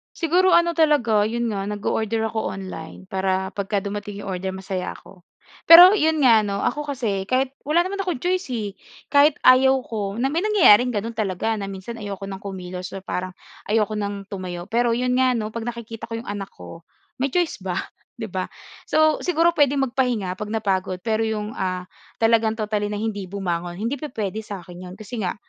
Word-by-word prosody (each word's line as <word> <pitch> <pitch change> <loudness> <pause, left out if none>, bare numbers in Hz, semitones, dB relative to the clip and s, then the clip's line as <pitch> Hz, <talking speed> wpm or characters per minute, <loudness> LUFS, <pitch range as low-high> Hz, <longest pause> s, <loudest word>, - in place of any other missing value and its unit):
Siguro, 360 +3 +3
ano 340 -1 +4
talaga, 285 -10 +3
'yon 230 +1 -1
nga, 195 - -2
nag-o-order 220 +2 -1
ako 220 0 -2
online, 185 -1 -8
para 190 0 -1
pagka 200 +1 -1
dumating 205 +1 -5
yung 195 - -5
order 190 +1 -3
masaya 190 -1 -4
ako. 185 -2 -14 0.5
Pero, 355 +4 +11
'yon 320 -5 +2
nga 230 -4 +6
'no, 200 -1 -2
ako 295 -1 -1
kasi 205 -7 -1
kahit 260 +1 +1
wala 310 +5 +2
naman 400 +1 -4
akong 360 -7 -2
choice 360 +1 -1
eh, 210 -5 -3 0.3
kahit 285 +1 +4
ayaw 265 +1 +6
ko 205 -2 -4
na 250 - +1
may 315 +6 0
nangyayaring 330 - +6
gano'n 230 +1 -3
talaga 215 0 -1
na 200 -2 -4
minsan 195 +4 -7
ayoko 200 -2 -6
ng 195 0 -7
kumilos 185 -2 -6
or 195 - -7
parang 185 0 -3 0.4
ayoko 215 0 +2
ng 200 -1 -4
tumayo. 180 -3 -6
Pero, 235 +3 +1
'yon 250 +2 +1
nga 255 0 +3
'no, 215 -1 -3
'pag 230 0 -4
nakikita 230 -1 -7
ko 230 - -3
yung 230 - -9
anak 200 -1 -5
ko, 165 - -12 0.4
may 270 +2 0
choice 345 -2 0
ba, 185 -2 -2 0.4
'di 225 - -4
ba? 185 0 -3 0.4
So, 310 0 +3
siguro 340 -1 +2
puwedeng 285 -3 +3
magpahinga 240 -7 -1
'pag 210 +2 -6
napagod 190 -4 -1
pero 220 0 +1
yung, 215 -1 -2
ah, 185 -1 -3 0.3
talagang 225 -1 +3
totally 210 -1 -1
na 210 - -3
hindi 210 -3 -3
bumangon 175 -3 -3
hindi 230 +6 -1
pupuwede 220 -7 -4
sa 205 -2 -7
akin 180 0 -11
'yon. - - -9
Kasi 215 +3 -7
nga, 180 - -1
215 Hz, 190 wpm, -23 LUFS, 195-255 Hz, 0.5 s, Pero